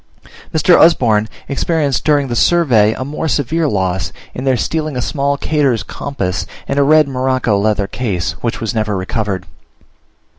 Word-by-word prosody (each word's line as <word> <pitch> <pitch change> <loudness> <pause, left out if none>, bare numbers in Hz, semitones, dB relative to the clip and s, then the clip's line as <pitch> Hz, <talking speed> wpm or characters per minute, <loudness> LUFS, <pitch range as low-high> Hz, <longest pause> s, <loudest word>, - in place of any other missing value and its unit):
Mr. 160 +3 +4
Usborne 110 -10 +4 0.2
experienced 145 -1 0
during 145 -2 +2
the 120 - -3
survey 120 -9 +3
a 130 - -5
more 150 +3 -3
severe 155 +3 0
loss, 95 -3 -1 0.2
in 130 - -5
their 130 -2 +2
stealing 155 +2 -2
a - - -1
small 140 +2 -1
Kater's 140 - 0
compass 100 -2 -4 0.2
in 140 - 0
a - - +5
red 155 +1 +5
morocco 130 -4 0
leather 105 -1 +1
case, 100 -6 -2
which 115 0 -2
was 115 +1 -3
never 110 -3 -1
recovered. 95 -1 -3
130 Hz, 155 wpm, -16 LUFS, 105-145 Hz, 0.2 s, a